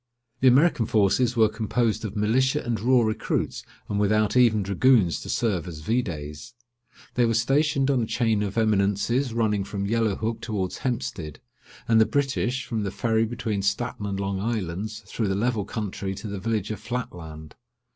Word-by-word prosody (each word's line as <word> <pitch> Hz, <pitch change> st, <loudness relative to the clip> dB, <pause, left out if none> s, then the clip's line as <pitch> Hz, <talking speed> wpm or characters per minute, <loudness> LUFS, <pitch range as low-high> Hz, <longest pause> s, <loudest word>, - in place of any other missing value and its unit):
The 130 Hz, -, +4 dB
American 130 Hz, -2 st, +4 dB
forces 110 Hz, +4 st, +2 dB
were 110 Hz, -1 st, +6 dB
composed 110 Hz, +1 st, -1 dB
of 110 Hz, -1 st, -5 dB
militia 130 Hz, +7 st, +1 dB
and 120 Hz, -3 st, -2 dB
raw 125 Hz, +3 st, +4 dB
recruits, 110 Hz, -1 st, -2 dB, 0.2 s
and 100 Hz, -, -1 dB
without 105 Hz, +1 st, +2 dB
even 115 Hz, -5 st, +4 dB
dragoons 100 Hz, -1 st, +3 dB
to -, -, -9 dB
serve 95 Hz, -7 st, 0 dB
as 80 Hz, -3 st, -7 dB
videts. 90 Hz, -1 st, -3 dB, 0.6 s
They 125 Hz, -, +2 dB
were 115 Hz, -, +1 dB
stationed 140 Hz, +3 st, +2 dB
on 130 Hz, -3 st, +2 dB
a 110 Hz, -, -2 dB
chain 115 Hz, -3 st, +1 dB
of 100 Hz, +1 st, -3 dB
eminences 110 Hz, +4 st, +1 dB
running 110 Hz, -3 st, +1 dB
from 100 Hz, 0 st, -4 dB
Yellow 110 Hz, -1 st, +1 dB
Hook 110 Hz, +2 st, -3 dB
towards 105 Hz, -6 st, -3 dB
Hempstead; 105 Hz, -, -3 dB, 0.5 s
and 115 Hz, -1 st, +5 dB
the 110 Hz, -, +4 dB
British, 135 Hz, -2 st, -1 dB
from 115 Hz, -3 st, -2 dB
the 100 Hz, -, -2 dB
Ferry 110 Hz, +3 st, +1 dB
between 110 Hz, -3 st, -3 dB
Staten 105 Hz, +1 st, -2 dB
and 100 Hz, -1 st, -3 dB
Long 100 Hz, -1 st, -2 dB
Islands, 105 Hz, 0 st, -3 dB
through 110 Hz, +2 st, -2 dB
the 95 Hz, -, 0 dB
level 110 Hz, -1 st, 0 dB
country 100 Hz, -3 st, -4 dB
to 105 Hz, -, -7 dB
the 100 Hz, -1 st, -5 dB
village 110 Hz, 0 st, -2 dB
of 110 Hz, -, -5 dB
Flatland. 80 Hz, -11 st, -6 dB
110 Hz, 175 wpm, -25 LUFS, 100-120 Hz, 0.6 s, were